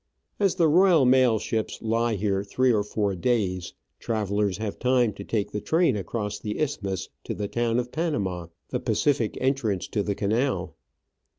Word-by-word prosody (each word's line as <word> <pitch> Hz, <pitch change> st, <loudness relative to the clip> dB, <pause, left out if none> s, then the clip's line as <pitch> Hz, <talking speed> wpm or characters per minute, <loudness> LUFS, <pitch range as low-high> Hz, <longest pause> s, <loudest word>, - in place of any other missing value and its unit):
As 195 Hz, -3 st, +2 dB
the 170 Hz, -3 st, +4 dB
Royal 170 Hz, -2 st, +5 dB
Mail 125 Hz, -3 st, +5 dB
ships 110 Hz, +1 st, -3 dB
lie 115 Hz, 0 st, 0 dB
here 100 Hz, -1 st, 0 dB
three 125 Hz, +5 st, +2 dB
or 105 Hz, -, +2 dB
four 105 Hz, -1 st, -1 dB
days, 95 Hz, -4 st, -1 dB, 0.2 s
travellers 105 Hz, -3 st, -1 dB
have 110 Hz, -1 st, -4 dB
time 125 Hz, -3 st, +2 dB
to 100 Hz, -, -8 dB
take 105 Hz, -1 st, -2 dB
the 105 Hz, -, -3 dB
train 165 Hz, -5 st, +2 dB
across 105 Hz, +1 st, -3 dB
the 105 Hz, -1 st, -4 dB
isthmus 100 Hz, -, -2 dB
to -, -, -4 dB
the 105 Hz, -, -3 dB
town 120 Hz, +1 st, 0 dB
of 125 Hz, 0 st, -2 dB
Panama, 100 Hz, -, -2 dB, 0.2 s
the 125 Hz, -, -1 dB
Pacific 125 Hz, 0 st, 0 dB
entrance 130 Hz, -8 st, 0 dB
to 105 Hz, -, 0 dB
the 100 Hz, 0 st, -2 dB
canal. 115 Hz, +8 st, -1 dB
110 Hz, 170 wpm, -26 LUFS, 100-130 Hz, 0.2 s, Royal